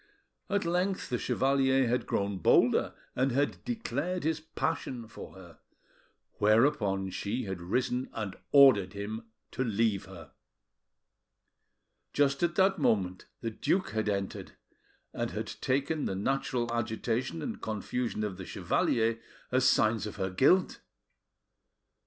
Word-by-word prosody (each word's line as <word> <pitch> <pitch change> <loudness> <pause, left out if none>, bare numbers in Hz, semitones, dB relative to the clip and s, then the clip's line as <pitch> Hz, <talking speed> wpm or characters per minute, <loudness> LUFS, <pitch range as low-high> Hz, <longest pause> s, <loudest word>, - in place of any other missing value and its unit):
At 200 -2 0
length 180 +3 0
the 125 - -1
chevalier 135 -1 +2
had 125 +2 0
grown 100 -1 -1
bolder, - - +3 0.2
and 130 +1 +1
had 140 +4 0
declared 180 - -2
his 160 0 0
passion 135 -6 -3
for - - -11
her; 90 -3 -14 0.8
whereupon 105 -4 +3
she 105 +7 -3
had 95 -3 -5
risen 125 +7 -1
and 105 -4 -4 0.2
ordered 130 -10 +6
him 110 +3 -5 0.2
to 130 - -1
leave 110 -3 0
her. 85 -6 -12 1.8
Just 140 -1 +2
at 170 0 +1
that 190 0 +3
moment 95 -3 +1 0.2
the 115 - -2
duke 185 - 0
had 110 -1 -1
entered, 100 -1 -3 0.6
and - - -2
had - - -4 0.2
taken 140 +3 0
the 95 - -2
natural 120 +2 -1
agitation 120 +5 -2
and 230 - -5
confusion 110 +1 -3
of 100 -3 -3
the 95 - -7
chevalier 115 0 +1 0.3
as 130 0 +4
signs 110 -2 +2
of 105 - -7
her 95 -2 -2
guilt. 160 - +3
120 Hz, 130 wpm, -30 LUFS, 100-140 Hz, 1.8 s, ordered